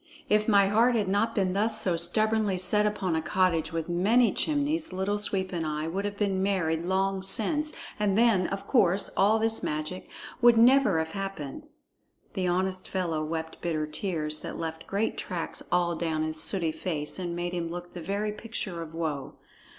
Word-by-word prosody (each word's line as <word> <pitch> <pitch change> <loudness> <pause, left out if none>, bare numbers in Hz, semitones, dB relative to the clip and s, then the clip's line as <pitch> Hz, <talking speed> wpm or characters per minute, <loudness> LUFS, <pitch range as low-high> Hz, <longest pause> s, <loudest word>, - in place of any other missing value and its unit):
If 210 0 +3
my 200 -3 +5
heart 230 +4 +3
had 210 -4 +1
not 205 +4 +1
been 190 -3 +1
thus 215 +2 +2
so 180 -5 +1
stubbornly 210 +3 +2
set 210 +3 +2
upon 195 -5 -1
a 160 - 0
cottage 165 -2 +1
with 165 -1 -3
many 205 +7 +3
chimneys, 305 0 0
Little 190 +3 -1
Sweep 190 -2 -2
and 170 -2 -1
I 155 0 -2
would 195 +5 -2
have 205 0 -4
been 195 -2 0
married 170 -4 0
long 190 +1 +1
since, 295 - -1 0.3
and 205 -1 +1
then, 220 -6 +4
of 195 0 -5
course, 195 -6 +2
all 210 +3 +4
this 225 0 0
magic 155 +4 -4 0.3
would 240 -1 +7
never 245 -5 +5
have 160 0 -1
happened." 195 -9 -6 0.7
The 185 -1 -1
honest 185 +1 -1
fellow 170 -5 -1
wept 160 +1 -5
bitter 160 -3 -1
tears 155 -1 -1
that - - -6
left 160 0 -5
great 205 +3 -1
tracks 175 -3 -3
all 175 -1 +2
down 160 -1 -1
his 155 0 -1
sooty 170 -5 +1
face 155 0 -3
and 175 -2 -3
made 175 +1 -3
him 170 -2 -2
look 175 +1 -7
the 175 - -7
very 200 +5 -2
picture 210 -5 -5
of 165 -1 -8
woe. 155 -5 -3
190 Hz, 185 wpm, -28 LUFS, 165-210 Hz, 0.7 s, would